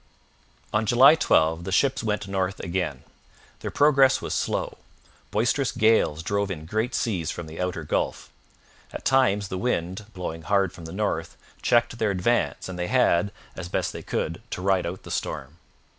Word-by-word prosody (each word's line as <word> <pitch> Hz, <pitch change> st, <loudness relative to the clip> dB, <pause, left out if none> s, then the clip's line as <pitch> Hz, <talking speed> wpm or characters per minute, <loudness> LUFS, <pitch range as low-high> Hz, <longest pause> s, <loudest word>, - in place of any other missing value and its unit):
On 105 Hz, +1 st, +1 dB
July 130 Hz, +6 st, +8 dB
12 80 Hz, -, +2 dB
the 95 Hz, -, -5 dB
ships 135 Hz, +8 st, +2 dB
went 105 Hz, -2 st, -1 dB
north 95 Hz, 0 st, -2 dB
again. 85 Hz, -7 st, -3 dB, 0.6 s
Their -, -, -4 dB
progress 140 Hz, -2 st, +4 dB
was -, -, -4 dB
slow. -, -, -2 dB, 0.5 s
Boisterous 120 Hz, +5 st, +1 dB
gales 110 Hz, -8 st, +2 dB
drove 100 Hz, +3 st, 0 dB
in 80 Hz, -5 st, -5 dB
great 110 Hz, +8 st, -1 dB
seas 90 Hz, -, -1 dB
from 85 Hz, -, -5 dB
the 80 Hz, +2 st, -7 dB
outer 90 Hz, -3 st, -2 dB
Gulf. 75 Hz, -, -2 dB, 0.6 s
At -, -, -8 dB
times 105 Hz, -7 st, +3 dB
the 95 Hz, -, -3 dB
wind, 95 Hz, -2 st, -2 dB
blowing 80 Hz, -3 st, -5 dB
hard 100 Hz, +1 st, +1 dB
from 85 Hz, -, -11 dB
the 80 Hz, -, -7 dB
north, 105 Hz, +3 st, -2 dB, 0.2 s
checked 120 Hz, 0 st, +2 dB
their 110 Hz, -, +2 dB
advance 100 Hz, +5 st, 0 dB
and 90 Hz, -1 st, -7 dB
they 90 Hz, -, -1 dB
had, 100 Hz, -6 st, +3 dB, 0.2 s
as 90 Hz, -2 st, -6 dB
best -, -, -1 dB
they -, -, -6 dB
could, 85 Hz, +5 st, -3 dB
to -, -, -5 dB
ride 95 Hz, -3 st, +2 dB
out 90 Hz, +2 st, -6 dB
the -, -, -9 dB
storm. 70 Hz, +6 st, -4 dB
95 Hz, 175 wpm, -25 LUFS, 85-115 Hz, 0.6 s, July